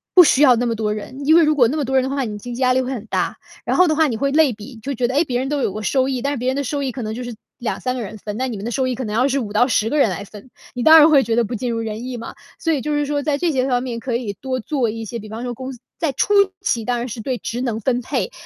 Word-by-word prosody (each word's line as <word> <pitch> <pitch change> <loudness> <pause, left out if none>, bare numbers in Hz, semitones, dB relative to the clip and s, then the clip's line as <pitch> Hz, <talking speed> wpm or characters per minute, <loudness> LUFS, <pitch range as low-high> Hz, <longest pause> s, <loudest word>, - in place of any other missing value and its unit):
不 365 - +10
需 290 -3 +4
要 255 -4 +7
那 240 +1 0
么 235 - 0
多 215 -1 -1
人。 235 +6 -7
因 315 +3 +6
为 340 - +7
如 305 0 +3
果 245 -5 +5
那 300 +6 -2
么 290 - -1
多 265 +1 -1
人 260 - +4
的 265 - -2
话， 275 0 -1
你 210 -4 -4
经 245 +4 -7
济 255 - -6
压 255 -1 +4
力 260 - +2
会 255 +1 -3
很 230 -4 -6
大， - - -1 0.3
然 - - 0
后 365 - +6
的 310 - +2
话 315 0 +4
你 230 -5 -2
会 275 +3 0
类 300 -4 +4
比， 220 +5 -11
就 280 +4 -3
觉 240 +1 +1
得， 255 - -3
诶， 300 - +4
别 250 -4 -1
人 265 +1 -2
都 290 -1 -1
有 200 - 0
过 215 +2 -5
收 260 +4 +1
益， 255 -2 -2
但 280 +2 -1
是 - - -3
别 250 +1 -3
人 260 - +1
的 280 - -1
收 285 +2 -2
益 265 - -1
可 250 - -6
能 215 0 -3
就 250 - -5
是 240 -2 -6 0.2
2-3 255 +1 -3
个 250 - -3
人 220 0 -7
分， 210 +1 -6
那 260 +2 -1
你 240 - -4
们 200 - -7
的 235 - -3
收 260 +2 0
益 255 - -1
可 260 - -4
能 210 0 -3
要 250 +4 +3
是 275 0 0
5-10 220 0 +1
个 300 - 0
人 275 -8 +4
来 185 +2 -4
分， 210 +5 -13 0.2
你 245 - -3
当 320 +3 +9
然 305 +2 +7
会 280 -3 +5
觉 225 0 0
得 240 - +3
不 230 +2 -4
尽 245 +2 -2
如 230 - -2
人 225 +1 -4
意 255 -1 -5
嘛。 230 - -8 0.2
所 330 -2 +1
以 280 - -1
就 300 - -2
是 295 0 +1
说 290 0 -1
在 290 -1 0
这 345 +1 0
些 265 -2 0
方 245 -1 +1
面 240 -3 -4
可 245 -1 -3
以 230 -4 -3
多 255 +5 -4
做 255 -1 -1
一 225 +1 -5
些， 235 +2 -5
比 215 - -10
方 225 +3 -6
说 245 -1 -3
公 260 +2 -7
司 245 - -13 0.2
在 320 -4 0
初 410 +10 0 0.3
期 235 - -1
当 245 0 0
然 240 - -3
是 230 -1 -6
对 255 +2 -2
职 240 +1 -4
能 235 -4 -2
分 245 +2 0
配， 470 - -2
250 Hz, 375 characters per minute, -20 LUFS, 230-275 Hz, 0.3 s, 不